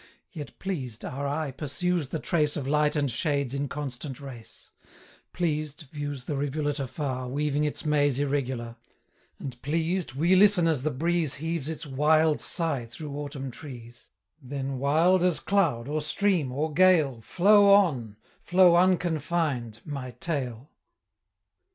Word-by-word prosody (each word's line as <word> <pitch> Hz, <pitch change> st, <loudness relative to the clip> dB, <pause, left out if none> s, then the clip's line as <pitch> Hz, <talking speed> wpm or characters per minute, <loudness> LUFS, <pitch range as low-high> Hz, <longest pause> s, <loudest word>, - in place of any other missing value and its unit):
Yet 150 Hz, -5 st, -8 dB
pleased, 135 Hz, -, -5 dB
our 140 Hz, +2 st, -4 dB
eye 145 Hz, 0 st, -2 dB
pursues 155 Hz, +4 st, -2 dB
the 160 Hz, -, -3 dB
trace 150 Hz, -2 st, 0 dB
15 150 Hz, -, -2 dB
Of 135 Hz, -, -6 dB
Light 150 Hz, +1 st, +2 dB
and 145 Hz, -3 st, +1 dB
Shade's 140 Hz, -1 st, -1 dB
inconstant 140 Hz, -1 st, -4 dB
race; 130 Hz, -5 st, -11 dB, 0.6 s
Pleased, 155 Hz, -2 st, -2 dB
views 145 Hz, -3 st, -5 dB
the 145 Hz, -, -3 dB
rivulet 145 Hz, +1 st, -2 dB
afar, 130 Hz, -1 st, -3 dB
Weaving 145 Hz, +2 st, 0 dB
its 150 Hz, -, -4 dB
maze 145 Hz, -3 st, +2 dB
irregular; 130 Hz, -5 st, -2 dB, 0.6 s
And 125 Hz, -3 st, -8 dB
pleased, 165 Hz, 0 st, -1 dB
we 170 Hz, +6 st, +3 dB
listen 195 Hz, -3 st, +6 dB
as 155 Hz, -6 st, +1 dB
the 155 Hz, -, 0 dB
breeze 160 Hz, +1 st, 0 dB
Heaves 160 Hz, 0 st, -3 dB
its 160 Hz, 0 st, -4 dB
wild 150 Hz, +3 st, +2 dB
sigh 160 Hz, -9 st, -2 dB
through 140 Hz, +5 st, -7 dB
Autumn 140 Hz, -2 st, -5 dB
trees; 120 Hz, -4 st, -11 dB, 0.3 s
20 130 Hz, -, -15 dB
Then, 135 Hz, -1 st, -3 dB
wild 165 Hz, +7 st, +3 dB
as 180 Hz, -2 st, +2 dB
cloud, 165 Hz, -13 st, +1 dB
or 155 Hz, +1 st, -1 dB
stream, 155 Hz, -1 st, +1 dB
or 150 Hz, +4 st, -2 dB
gale, 160 Hz, -9 st, +4 dB
Flow 200 Hz, -, +5 dB
on, 135 Hz, -, +3 dB, 0.2 s
flow 180 Hz, -1 st, +5 dB
unconfined, 160 Hz, -, 0 dB
my 135 Hz, -4 st, -6 dB
Tale! 135 Hz, -5 st, -4 dB
145 Hz, 145 wpm, -27 LUFS, 135-165 Hz, 0.6 s, listen